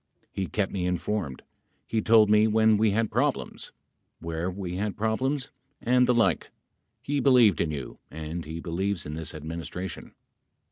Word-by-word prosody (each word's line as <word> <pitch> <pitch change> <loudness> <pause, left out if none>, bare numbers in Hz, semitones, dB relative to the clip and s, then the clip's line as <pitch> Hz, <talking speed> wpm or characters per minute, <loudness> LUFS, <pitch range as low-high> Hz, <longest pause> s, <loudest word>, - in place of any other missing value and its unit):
He 95 -1 -3
kept 100 -3 -1
me 90 -2 -1
informed. 90 -5 -2 0.4
He 110 - -1
told 110 0 +6
me 105 +1 +5
when 110 0 +4
we 110 +1 +3
had 110 +2 0
problems. - - -1 0.5
where 85 +2 -3
we 90 -1 -5
had 105 +2 -2
problems 130 +6 -1 0.3
and 125 +1 +3
the 125 - +4
like. 115 - +2 0.5
He 145 0 -1
believed 125 - +5
in 85 - 0
you 70 -5 -6
and 80 +2 -5
he 80 +2 -6
believes 90 +3 -2
in 75 - -5
this 80 +1 -4
Adminis 80 +1 -6
tration. 90 -1 -6
100 Hz, 160 wpm, -27 LUFS, 85-110 Hz, 0.5 s, told